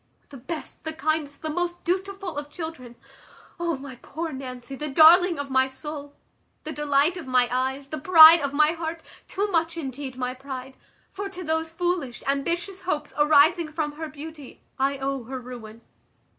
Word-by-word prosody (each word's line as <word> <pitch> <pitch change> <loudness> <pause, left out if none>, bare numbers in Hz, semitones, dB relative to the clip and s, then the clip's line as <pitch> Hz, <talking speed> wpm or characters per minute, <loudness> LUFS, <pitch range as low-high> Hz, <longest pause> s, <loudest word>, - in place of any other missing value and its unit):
The 280 - -10
best, 305 +6 -7
the 315 0 -4
kindest, 310 -2 -2
the 315 - -2
most 350 +2 -3
dutiful 385 +1 -2
of 290 0 -5
children! 295 -7 -7 0.6
O 340 -3 -1
my 265 -2 -10
poor 325 +6 -5
Nancy, 255 -1 -7
the 300 +3 -5
darling 335 +5 +7
of 285 -1 -5
my 260 0 +3
soul! 285 +1 -8 0.5
the 310 - -5
delight 295 +3 +2
of 330 -6 -8
my 250 -1 +3
eyes! 265 +2 -2
the 310 - -4
pride 325 +1 +9
of 280 -1 -1
my 300 +2 +4
heart! 330 0 -5 0.2
too 400 +1 -1
much, 330 -1 0
indeed, 270 -3 -6
my 250 0 -2
pride; 265 0 -8 0.4
for 400 0 -5
to 370 -2 -7
those 320 0 -1
foolish, 335 -6 -2
ambitious 340 +8 -2
hopes, 300 -5 -3
arising 305 +2 +4
from 305 -1 -2
her 315 +2 -6
beauty, 300 -2 -10 0.2
I 275 +1 +1
owe 270 -2 -3
her 260 +2 -5
ruin. 235 -3 -10
300 Hz, 170 wpm, -25 LUFS, 270-330 Hz, 0.6 s, pride